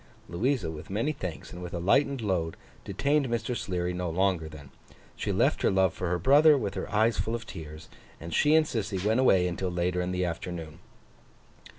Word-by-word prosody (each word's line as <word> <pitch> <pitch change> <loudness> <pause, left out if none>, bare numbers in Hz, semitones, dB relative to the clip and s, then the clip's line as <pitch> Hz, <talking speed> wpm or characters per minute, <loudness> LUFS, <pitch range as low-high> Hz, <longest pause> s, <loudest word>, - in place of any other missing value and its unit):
Louisa, 105 - -1
with 80 +6 -9
many 115 +10 0
thanks 90 - -6
and 90 - -8
with 90 0 -6
a - - -2
lightened 135 +8 +2
load, 90 -6 -1 0.3
detained 140 +8 0
Mr. 120 +1 -2
Sleary 90 -4 -2
no 90 -1 -3
longer 90 -2 0
then. 70 -3 -12 0.4
She - - -2
left - - +2
her - - +3
love 95 -2 +2
for 90 - -3
her 90 - +1
brother, 145 - +6
with 105 -6 -3
her - - -5
eyes 110 +2 +2
full 115 - -1
of 115 -2 -6
tears; 80 -5 -9 0.3
and 80 0 -7
she 150 +1 +4
and 160 -1 +5
Sissy 110 -7 -3
went 110 +3 +2
away 95 -9 +4
until 90 +1 -2
later 90 +1 -1
in 90 0 -2
the 90 0 0
afternoon. 85 -1 -5
95 Hz, 200 wpm, -28 LUFS, 85-115 Hz, 0.4 s, brother